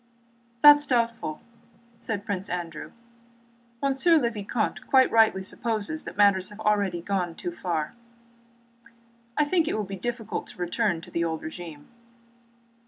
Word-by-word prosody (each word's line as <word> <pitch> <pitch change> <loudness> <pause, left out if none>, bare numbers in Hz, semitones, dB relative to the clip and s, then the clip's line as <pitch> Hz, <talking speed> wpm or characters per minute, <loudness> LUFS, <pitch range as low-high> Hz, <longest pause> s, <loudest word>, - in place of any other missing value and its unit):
"That 295 0 +10
is 290 0 -3
doubtful," 230 - -1 0.6
said 225 -4 -4
Prince 195 -1 -3
Andrew. 170 -3 -5 0.9
"Monsieur 275 +5 +4
le 240 -6 +1
Vicomte 215 +1 -3
quite 260 -1 +5
rightly 220 -4 +4
supposes 225 +8 -1
that 180 - -8
matters 200 -2 +4
have 205 +1 -13
already 200 -5 +1
gone 180 -4 -2
too 350 - -5
far. 165 - -3 1.4
I 300 - +4
think 325 +1 +1
it - - 0
will 215 - -1
be 195 0 -6
difficult 230 +2 -4
to - - -13
return 180 0 -1
to - - -13
the 170 - 0
old 160 -1 -3
regime." 160 -2 -8
205 Hz, 145 wpm, -26 LUFS, 175-240 Hz, 1.4 s, That